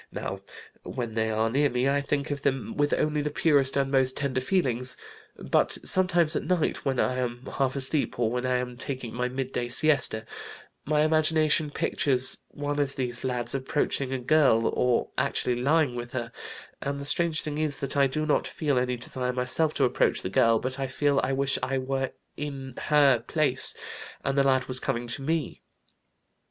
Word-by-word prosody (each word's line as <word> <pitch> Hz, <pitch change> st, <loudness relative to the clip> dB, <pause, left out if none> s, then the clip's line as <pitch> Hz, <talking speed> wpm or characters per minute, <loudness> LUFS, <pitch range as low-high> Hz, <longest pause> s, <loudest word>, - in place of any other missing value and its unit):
Now -, -, -5 dB, 0.4 s
when 120 Hz, -3 st, -5 dB
they 110 Hz, 0 st, 0 dB
are 110 Hz, +1 st, +1 dB
near 145 Hz, +3 st, +2 dB
me 125 Hz, +1 st, 0 dB
I 140 Hz, +1 st, +2 dB
think 140 Hz, +1 st, -2 dB
of 145 Hz, -1 st, -3 dB
them 135 Hz, -3 st, -1 dB
with 145 Hz, 0 st, +1 dB
only 150 Hz, -1 st, +1 dB
the 150 Hz, -, -1 dB
purest 140 Hz, -3 st, +2 dB
and 135 Hz, -1 st, 0 dB
most 130 Hz, -1 st, +2 dB
tender 135 Hz, -2 st, -1 dB
feelings, 130 Hz, -6 st, +1 dB, 0.4 s
but -, -, +1 dB
sometimes 175 Hz, -4 st, +3 dB
at -, -, 0 dB
night 180 Hz, -4 st, -1 dB
when 135 Hz, -3 st, -1 dB
I 130 Hz, 0 st, +1 dB
am 120 Hz, 0 st, -4 dB
half 135 Hz, -1 st, -1 dB
asleep, 140 Hz, +2 st, +1 dB
or 115 Hz, -2 st, +1 dB
when 125 Hz, 0 st, -2 dB
I 130 Hz, 0 st, +1 dB
am 125 Hz, -1 st, -4 dB
taking 130 Hz, -3 st, -5 dB
my 125 Hz, +1 st, -1 dB
midday 130 Hz, -1 st, -3 dB
siesta, 125 Hz, -4 st, +3 dB, 0.6 s
my 150 Hz, +1 st, +2 dB
imagination 155 Hz, -1 st, +2 dB
pictures 130 Hz, -2 st, +1 dB
one 145 Hz, 0 st, -4 dB
of 140 Hz, -1 st, -1 dB
these 125 Hz, -2 st, -3 dB
lads 125 Hz, -2 st, +1 dB
approaching 135 Hz, 0 st, -1 dB
a 135 Hz, -, -1 dB
girl, 125 Hz, -4 st, +3 dB
or 125 Hz, -1 st, +1 dB
actually 120 Hz, -1 st, 0 dB
lying 145 Hz, -1 st, +2 dB
with 120 Hz, 0 st, -6 dB
her, 120 Hz, -2 st, -4 dB, 0.5 s
and 140 Hz, 0 st, -3 dB
the 140 Hz, -, -6 dB
strange 160 Hz, +1 st, +1 dB
thing 150 Hz, 0 st, -2 dB
is 155 Hz, -2 st, -1 dB
that 140 Hz, +1 st, -4 dB
I 140 Hz, -1 st, +4 dB
do 155 Hz, +4 st, -2 dB
not 150 Hz, -, +1 dB
feel 145 Hz, -5 st, 0 dB
any 125 Hz, 0 st, -1 dB
desire 125 Hz, +1 st, -3 dB
myself 130 Hz, +5 st, 0 dB
to -, -, +1 dB
approach -, -, +1 dB
the -, -, -2 dB
girl, 115 Hz, 0 st, +4 dB
but 130 Hz, +4 st, -4 dB
I 135 Hz, -, -1 dB
feel 140 Hz, +1 st, +1 dB
I -, -, 0 dB
wish 135 Hz, 0 st, +1 dB
I 135 Hz, 0 st, -1 dB
were 135 Hz, 0 st, -2 dB, 0.3 s
in 135 Hz, -3 st, -6 dB
her 140 Hz, -5 st, +4 dB
place 140 Hz, -3 st, +1 dB, 0.5 s
and 135 Hz, -, 0 dB
the 140 Hz, -, +4 dB
lad 130 Hz, -2 st, +2 dB
was 130 Hz, 0 st, -3 dB
coming 120 Hz, -3 st, -2 dB
to 130 Hz, -, -3 dB
me. 160 Hz, +3 st, -2 dB
135 Hz, 190 wpm, -27 LUFS, 125-145 Hz, 0.6 s, I